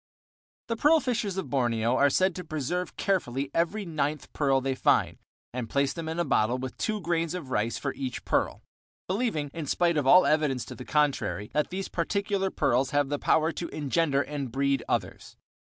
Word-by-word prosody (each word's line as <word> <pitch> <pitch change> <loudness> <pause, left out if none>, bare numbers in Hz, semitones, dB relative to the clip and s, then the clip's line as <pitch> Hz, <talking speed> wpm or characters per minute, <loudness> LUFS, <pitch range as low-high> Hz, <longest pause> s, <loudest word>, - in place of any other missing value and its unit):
The 230 - -1
pearl 300 +7 +5
fishers 235 -8 -2
of 155 -10 -4
Borneo 120 -3 +1
are 140 +2 +4
said 185 +6 +2
to 180 - -6
preserve 165 +3 -3
carefully 140 -8 -1
every 195 +5 0
ninth 155 -3 -2
pearl 135 -2 +2
they 135 0 -1
find, 130 - +2 0.3
and 120 -3 -4
place 140 0 +1
them 165 -2 -5
in 160 - -4
a 175 - +1
bottle 120 +4 +2
with 130 -1 -5
two 215 -1 -1
grains 165 0 -1
of 150 -8 -7
rice 115 0 0
for 140 - -3
each 130 -3 -5
pearl, - - 0 0.4
believing, 185 - -1
in 160 -3 -5
spite 170 +1 +2
of 140 -3 0
all 180 +6 +8
evidence 150 -5 +1
to - - -8
the 125 - -9
contrary, 145 -8 0
that 150 - +1
these 190 +1 -4
particular 195 +2 -1
pearls 130 -5 +1
have 145 -1 +1
the 145 0 -1
power 160 +1 +2
to 170 +2 -5
engender 145 -1 +1
and 140 -2 -5
breed 140 +2 +1
others. - - -3
150 Hz, 190 wpm, -28 LUFS, 135-180 Hz, 0.4 s, all